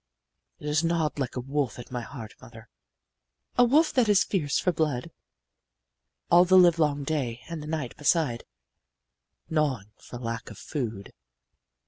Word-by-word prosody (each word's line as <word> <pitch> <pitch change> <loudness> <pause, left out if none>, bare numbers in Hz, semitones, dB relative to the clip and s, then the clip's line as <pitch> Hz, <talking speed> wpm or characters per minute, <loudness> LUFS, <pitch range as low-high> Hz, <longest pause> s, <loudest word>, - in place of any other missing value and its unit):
"'It - - -12
has 150 +2 +1
gnawed 165 -3 0
like 130 -3 -3
a - - -2
wolf 135 +1 -2
at 120 - -10
my 125 -1 -3
heart, 115 -3 -9
mother, 115 -3 -13 0.9
A 245 - +6
wolf 300 +6 +4
that 245 -5 +3
is 205 -1 +5
fierce 150 -8 -1
for 180 - +1
blood, 150 -6 -1 1.2
All 175 +1 +8
the 185 +1 +5
livelong 160 -5 +4
day 130 -6 -2
and 165 -2 -6
the 150 - -8
night, 155 -6 -3
beside 145 -6 +1 1.0
Gnawing 135 -10 -1
for 120 - -10
lack 115 -1 -5
of - - -11
food. 115 -9 -5
150 Hz, 150 wpm, -27 LUFS, 125-165 Hz, 1.2 s, All